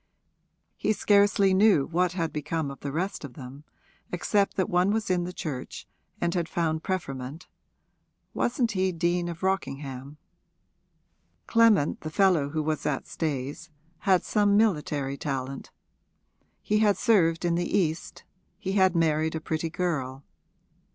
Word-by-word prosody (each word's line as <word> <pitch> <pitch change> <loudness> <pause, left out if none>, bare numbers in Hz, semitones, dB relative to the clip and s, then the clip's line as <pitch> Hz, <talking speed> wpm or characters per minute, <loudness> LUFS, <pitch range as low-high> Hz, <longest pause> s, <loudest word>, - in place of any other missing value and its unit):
He 215 - +1
scarcely 200 -2 +3
knew 190 -7 +5
what 175 +1 0
had 165 -3 -2
become 155 -1 -2
of 135 - -10
the 140 - -5
rest 185 +6 -3
of 130 -4 -9
them, 135 +2 -10 0.5
except 200 +3 +1
that 190 - +1
one 180 +2 +2
was 215 -2 0
in 175 -1 +1
the 180 - -5
Church 145 -7 -6 0.3
and 170 0 0
had 170 -3 -1
found 160 -2 -1
preferment 145 -4 -4 0.9
wasn't 240 -1 0
he 190 -1 +1
Dean 175 0 0
of 170 +1 -8
Rockingham? 140 -7 -3 1.3
Clement, 225 -9 +3
the 155 - -5
fellow 170 -4 +3
who 155 +1 -2
was 155 0 -2
at 145 -3 -2
Stayes, 145 +1 -4 0.3
had 190 -2 +3
some 205 -1 +2
military 150 -9 0
talent; 135 -1 -4 0.9
he 210 0 +1
had 205 -3 +3
served 180 -9 +3
in 170 - +2
the 175 +3 0
East, 165 -4 -2 0.3
he 190 -1 -4
had 190 -2 +3
married 160 -1 +1
a - - -1
pretty 160 +1 -3
girl. 145 -7 -3
170 Hz, 145 wpm, -27 LUFS, 150-190 Hz, 1.3 s, knew